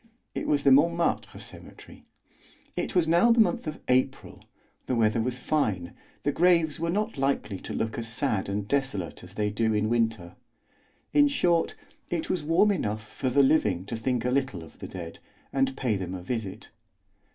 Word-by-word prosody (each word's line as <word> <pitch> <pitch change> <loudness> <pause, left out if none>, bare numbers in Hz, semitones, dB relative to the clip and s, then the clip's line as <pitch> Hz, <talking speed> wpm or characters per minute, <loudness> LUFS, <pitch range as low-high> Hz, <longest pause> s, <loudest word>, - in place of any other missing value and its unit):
It - - -3
was 145 -1 +2
the 140 - +5
Montmartre 170 +5 +2
Cemetery. - - -12 0.7
It - - -3
was 175 -3 +3
now 175 +9 +5
the 230 - +4
month 225 -2 +2
of 155 - -4
April; 130 +1 0 0.4
the 130 - 0
weather 110 0 +2
was 125 +2 -1
fine, 105 - -1 0.3
the 145 - +1
graves 165 -1 +3
were 165 +1 -1
not 210 -2 -1
likely 115 -8 -1
to - - -8
look 110 +1 -2
as 115 - -4
sad 115 -5 -1
and 100 0 -2
desolate 135 -9 -2
as 90 +2 -13
they 105 0 0
do 110 +1 +1
in 105 +1 +1
winter; 115 -7 0 0.8
in 290 0 +6
short, 175 -12 +1 0.3
it 170 -2 -2
was 180 - 0
warm 165 +7 +3
enough 110 - -2
for 130 +4 -3
the 140 +3 +4
living 105 - +2
to 110 - -4
think 120 +1 -1
a 125 - +1
little 130 -10 -1
of 80 - -15
the - - -6
dead, 85 -3 -8 0.3
and 135 0 +1
pay 120 -5 0
them 95 -1 -4
a 90 - -7
visit. 110 -3 -5
125 Hz, 185 wpm, -27 LUFS, 105-155 Hz, 0.8 s, in